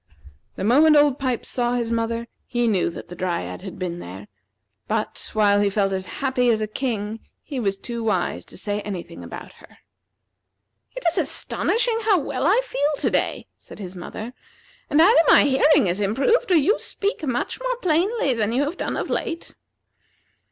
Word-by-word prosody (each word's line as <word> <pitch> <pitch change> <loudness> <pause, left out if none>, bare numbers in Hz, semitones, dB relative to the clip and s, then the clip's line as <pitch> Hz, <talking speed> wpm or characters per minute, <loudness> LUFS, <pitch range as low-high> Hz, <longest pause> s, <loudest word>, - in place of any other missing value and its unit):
The - - -5
moment 295 +8 +5
Old 290 -2 +4
Pipes 255 -4 -2
saw 245 -1 -1
his 235 -2 -1
mother, 230 0 -1 0.2
he 240 -1 0
knew 195 -6 +2
that 170 - -9
the 175 - -8
Dryad 90 - -3
had - - -8
been 175 -2 -4
there; 95 - -9 0.6
but, 220 0 -2
while 205 -2 +4
he 205 0 +3
felt 195 -1 0
as 190 -1 -3 0.2
happy 250 -2 +2
as 225 -2 +3
a 215 - 0
king, 215 -2 -3 0.2
he 280 -4 -5
was 200 -4 -1
too 235 +2 -5
wise 210 -6 -1
to - - -13
say 205 +2 -3
any 195 -5 -5
thing 170 - -12
about - - -9
her. - - -18 1.2
"It - - -6
is 335 - +2
astonishing 460 0 +1
how 425 -3 +3
well 300 -1 -1
I 425 +7 +4
feel 290 - -1
to - - 0
day," - - -1
said - - -12
his 190 -3 -8
mother; 215 +6 -7 0.6
"and 295 - +3
either 350 +2 +7
my - - +7
hearing 285 0 +4
has 185 +3 -1
improved 275 - +2
or 355 - +6
you 355 - +3
speak 400 -4 -3
much 255 - -2
more - - -1
plainly 365 - +1
than 220 -2 0
you 265 +4 +2
have 305 +5 -3
done - - -3
of - - -2
late." 335 -6 -3
240 Hz, 185 wpm, -23 LUFS, 205-305 Hz, 1.2 s, either